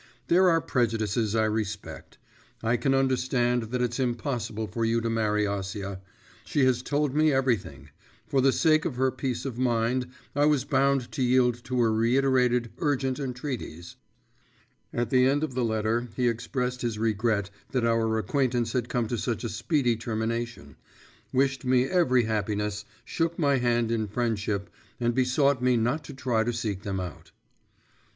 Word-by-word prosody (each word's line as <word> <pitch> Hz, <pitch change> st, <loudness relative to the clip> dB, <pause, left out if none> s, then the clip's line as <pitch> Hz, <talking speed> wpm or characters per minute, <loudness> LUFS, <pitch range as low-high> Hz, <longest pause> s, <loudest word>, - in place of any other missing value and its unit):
There 185 Hz, +2 st, +5 dB
are 165 Hz, -1 st, +3 dB
prejudices 115 Hz, -4 st, 0 dB
I 110 Hz, -1 st, +3 dB
respect; 110 Hz, -1 st, -4 dB, 0.5 s
I 115 Hz, +2 st, +2 dB
can 135 Hz, +2 st, +1 dB
understand 125 Hz, -2 st, +1 dB
that 125 Hz, +1 st, -1 dB
it's 120 Hz, +1 st, -2 dB
impossible 120 Hz, -3 st, -2 dB
for 115 Hz, +3 st, -3 dB
you 115 Hz, +1 st, +2 dB
to 115 Hz, 0 st, -2 dB
marry 105 Hz, -2 st, +1 dB
Acia. 100 Hz, -1 st, -4 dB, 0.4 s
She 145 Hz, -4 st, +1 dB
has 125 Hz, -2 st, +2 dB
told 145 Hz, +1 st, 0 dB
me 155 Hz, +1 st, +3 dB
everything; 130 Hz, -7 st, -1 dB, 0.4 s
for 135 Hz, -, +2 dB
the 135 Hz, +1 st, +4 dB
sake 155 Hz, +1 st, +3 dB
of 140 Hz, -, -3 dB
her 130 Hz, +1 st, +2 dB
peace 130 Hz, 0 st, -3 dB
of 125 Hz, -3 st, -4 dB
mind, 125 Hz, 0 st, +1 dB, 0.3 s
I 145 Hz, +1 st, +4 dB
was 150 Hz, -4 st, +2 dB
bound 135 Hz, -2 st, +1 dB
to -, -, -4 dB
yield 125 Hz, -1 st, +2 dB
to 125 Hz, 0 st, -1 dB
her 115 Hz, -2 st, +3 dB
reiterated 125 Hz, 0 st, +2 dB
urgent 135 Hz, -3 st, 0 dB
entreaties.' 125 Hz, -, -5 dB, 1.0 s
At 120 Hz, -1 st, -2 dB
the 130 Hz, 0 st, +5 dB
end 145 Hz, +3 st, +1 dB
of 150 Hz, -5 st, -2 dB
the 125 Hz, 0 st, 0 dB
letter 110 Hz, +1 st, 0 dB
he 125 Hz, -1 st, +1 dB
expressed 125 Hz, +2 st, -2 dB
his 115 Hz, -3 st, -2 dB
regret 110 Hz, -2 st, 0 dB, 0.2 s
that 125 Hz, -3 st, 0 dB
our 115 Hz, -1 st, +2 dB
acquaintance 120 Hz, +2 st, 0 dB
had 125 Hz, -1 st, -1 dB
come 120 Hz, -2 st, 0 dB
to 120 Hz, 0 st, -2 dB
such 115 Hz, -1 st, -2 dB
a 115 Hz, -, -2 dB
speedy 120 Hz, +2 st, +1 dB
termination, 115 Hz, -, -4 dB, 0.5 s
wished 135 Hz, +1 st, +1 dB
me 125 Hz, -1 st, +3 dB
every 135 Hz, -8 st, +3 dB
happiness, 105 Hz, -1 st, -2 dB, 0.2 s
shook 165 Hz, +6 st, -1 dB
my 140 Hz, -4 st, +3 dB
hand 120 Hz, -2 st, +1 dB
in 110 Hz, -2 st, 0 dB
friendship, 105 Hz, -2 st, -2 dB, 0.3 s
and 120 Hz, 0 st, +1 dB
besought 130 Hz, +1 st, +2 dB
me 125 Hz, -1 st, +3 dB
not 125 Hz, +7 st, 0 dB
to 145 Hz, -, -8 dB
try 125 Hz, -4 st, 0 dB
to 120 Hz, +2 st, -1 dB
seek 110 Hz, -5 st, -3 dB
them 100 Hz, -1 st, -3 dB
out. 90 Hz, -5 st, -7 dB
120 Hz, 165 wpm, -27 LUFS, 110-130 Hz, 1.0 s, There